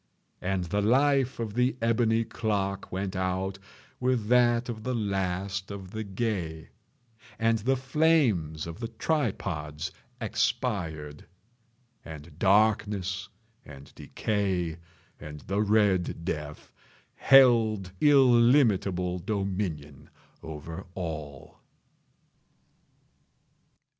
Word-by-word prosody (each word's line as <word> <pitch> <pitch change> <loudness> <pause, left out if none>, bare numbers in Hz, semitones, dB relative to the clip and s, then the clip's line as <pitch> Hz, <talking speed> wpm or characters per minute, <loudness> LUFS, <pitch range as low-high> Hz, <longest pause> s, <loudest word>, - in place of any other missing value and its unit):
And 95 0 -1
the 100 +4 -1
life 135 +4 +2
of 110 -3 -3
the 125 +3 +1
ebony 115 0 +2
clock 100 -3 -2
went 95 +1 -3
out 95 +1 -2 0.4
with 125 -4 0
that 120 -1 +4
of 115 -3 -5
the 125 +3 -2
last 95 -2 -2
of 95 -2 -8
the 110 0 -4
gay. 95 -6 -3 0.7
And 115 0 +2
the 130 +5 +1
flames 130 - +1
of 85 +3 -8
the 115 - -3
tripods 95 - -2 0.3
expired. 80 - -2 0.8
And 80 0 -11
Darkness 100 -2 +2 0.3
and 70 -1 -13
Decay 95 -6 -2 0.4
and 75 -1 -9
the 100 +3 -1
Red 100 -5 +1
Death 75 -2 -5 0.4
held 115 -8 +5
illimitable 115 -10 +4
dominion 95 -8 -4 0.3
over 80 +2 -8
all. 75 -6 -7
100 Hz, 95 wpm, -28 LUFS, 90-115 Hz, 0.8 s, held